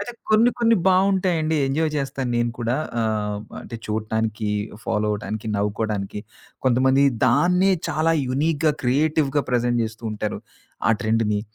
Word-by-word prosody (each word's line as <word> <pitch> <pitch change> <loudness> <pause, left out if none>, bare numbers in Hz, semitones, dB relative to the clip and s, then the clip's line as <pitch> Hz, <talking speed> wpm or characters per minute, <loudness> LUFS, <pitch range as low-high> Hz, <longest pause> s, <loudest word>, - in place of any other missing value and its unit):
అయితే 240 +4 -5 0.2
కొన్ని 220 +3 +5
కొన్ని 230 -1 +4
బావుంటాయండి. 185 -4 +2
ఎంజాయ్ 155 +3 0
చేస్తాను 135 -2 -3
నేను 120 0 +1
కూడా. 120 +1 0 0.2
ఆహ్, 105 -2 -1 0.2
అంటే 115 - -8
చూడటానికి 110 0 -2 0.4
ఫాలో 105 -2 0
అవ్వటానికి 105 +1 -4
నవ్వుకోవడానికి 105 -1 -2 0.5
కొంతమంది 130 +2 +4 0.2
దాన్నే 180 +9 +3 0.2
చాలా 160 +1 +1 0.2
యూనీక్‌గా 150 +3 +1
క్రియేటివ్‌గా 145 +2 +2
ప్రెజెంట్ 120 -1 +1
చేస్తూ 110 +1 -8
ఉంటారు. 105 0 -3 0.5
ఆ - - +6
ట్రెండ్‌ని. 110 -1 +1
125 Hz, 125 wpm, -23 LUFS, 110-160 Hz, 0.5 s, ఆ